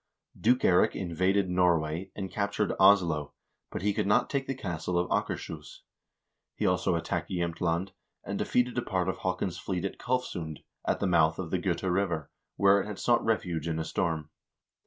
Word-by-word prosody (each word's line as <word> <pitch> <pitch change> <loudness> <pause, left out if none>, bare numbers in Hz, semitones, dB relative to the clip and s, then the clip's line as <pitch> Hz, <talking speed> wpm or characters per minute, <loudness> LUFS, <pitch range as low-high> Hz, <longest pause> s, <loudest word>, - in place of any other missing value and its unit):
Duke 125 +3 +2
Eirik 90 - +4
invaded 95 +2 +1
Norway, 90 -1 +1
and 95 -3 -5
captured 100 +1 0
Oslo, 85 -7 +4 0.3
but - - -5
he 105 0 +2
could 105 -1 -1
not 120 +5 +3
take 135 -1 -1
the 135 - -2
castle 90 -6 -3
of 90 0 0
Akers - - -2
hus. - - -10 0.7
He - - -2
also 90 -1 +2
attacked 85 0 -2
Jsemtland, 85 0 -1 0.3
and - - -4
defeated 125 0 +1
a - - -1
part 95 -5 -1
of 95 0 -1
Haakon's 90 -1 -2
fleet 95 -1 -3
at 95 - -4
Kalfsund, 90 -11 -3 0.2
at - - 0
the - - +1
mouth 80 -3 +3
of 85 -3 -5
the 95 - +1
Gota 90 0 -1
River, 85 -6 -1 0.2
where 100 0 +5
it - - -6
had 105 -2 -6
sought 120 -1 +2
refuge 85 -8 -1
in 80 -1 -1
a 80 - -1
storm. 80 -2 -2
90 Hz, 180 wpm, -29 LUFS, 85-100 Hz, 0.7 s, where